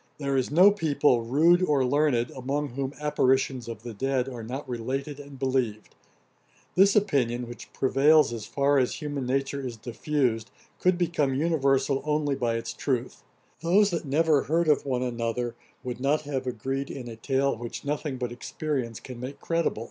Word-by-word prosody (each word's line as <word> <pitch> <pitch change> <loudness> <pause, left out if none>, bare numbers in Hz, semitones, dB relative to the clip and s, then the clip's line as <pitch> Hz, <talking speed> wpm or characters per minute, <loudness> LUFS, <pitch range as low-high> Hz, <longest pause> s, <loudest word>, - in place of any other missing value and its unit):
There 140 -2 -1
is 130 -2 +1
no 180 +7 +7
people, 150 - +2
rude 160 +9 +4
or 145 -7 +2
learned, 125 -3 +2
among 140 +3 -2
whom 135 +2 -3
apparitions 130 -4 +1
of 115 -2 -7
the 120 -1 -6
dead 130 +3 0
are 125 -3 -6
not 130 +6 -6
related 135 +4 -4
and 140 -1 -10
believed. 130 -5 -1 0.8
This 195 +2 +5
opinion, 125 - +1
which 120 - -10
prevails 140 +1 +4
as 115 -3 -6
far 140 0 +2
as 125 - 0
human 145 -4 -4
nature 135 +2 -1
is 125 -3 -5
diffused, 120 -1 -1 0.3
could 180 -1 +3
become 155 -6 +1
universal 140 -3 +1
only 150 -1 0
by 120 -3 0
its 115 - -4
truth; - - -2 0.4
those 195 +5 +4
that 170 - -2
never 150 0 +3
heard 165 +2 +1
of 150 -2 +2
one 125 -2 0
another, 120 0 -2 0.3
would 125 -1 -5
not 140 +4 +1
have 135 -3 -3
agreed 135 +3 -3
in 130 -3 -7
a 115 - -7
tale 135 +4 0
which 120 +3 -7
nothing 145 -1 -2
but 125 -1 -3
experience 125 -2 -3
can 125 -2 -9
make 130 +3 -7
credible. 165 -8 -1
135 Hz, 170 wpm, -27 LUFS, 125-150 Hz, 0.8 s, no